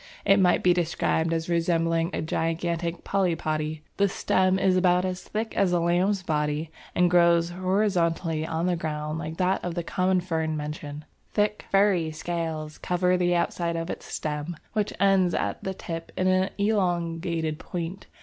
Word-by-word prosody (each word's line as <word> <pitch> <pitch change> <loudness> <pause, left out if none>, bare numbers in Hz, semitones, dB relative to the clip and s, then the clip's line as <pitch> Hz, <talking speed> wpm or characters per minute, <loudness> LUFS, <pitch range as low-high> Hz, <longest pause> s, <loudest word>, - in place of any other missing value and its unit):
It 195 +1 +5
might 180 -2 +3
be 180 - +5
described 165 -1 0
as 165 0 -1
resembling 165 -1 +1
a 160 - -2
gigantic 170 +1 -2
Polypody; 155 -5 -1
the 200 0 +3
stem 185 +1 +2
is 190 -1 +3
about 180 0 +3
as 185 0 -3
thick 220 +1 -4
as 190 -3 +2
a 175 - +3
lamb's 180 +3 +1
body 150 -1 -1 0.2
and 180 0 +4
grows 170 -1 +4
horizontally 180 -4 0
on 160 +1 -2
the 180 -1 +2
ground 155 -1 -3
like 160 0 -5
that 185 +1 +1
of 175 -1 -3
the 175 - -2
common 185 +2 +1
fern 160 -3 -2
mentioned; 150 0 -6 0.3
thick 210 0 +1
furry 195 -5 +3
scales 160 -1 -4
cover 180 0 +1
the 175 -1 +2
outside 170 0 0
of 165 +1 -3
its - - -7
stem, 150 +2 -3 0.2
which 210 -2 0
ends 195 -3 +3
at - - -2
the 190 0 -3
tip 165 -2 -6
in 185 - +1
an 185 0 +3
elongated 170 -6 0
point. 175 +2 -5
170 Hz, 165 wpm, -26 LUFS, 165-185 Hz, 0.3 s, It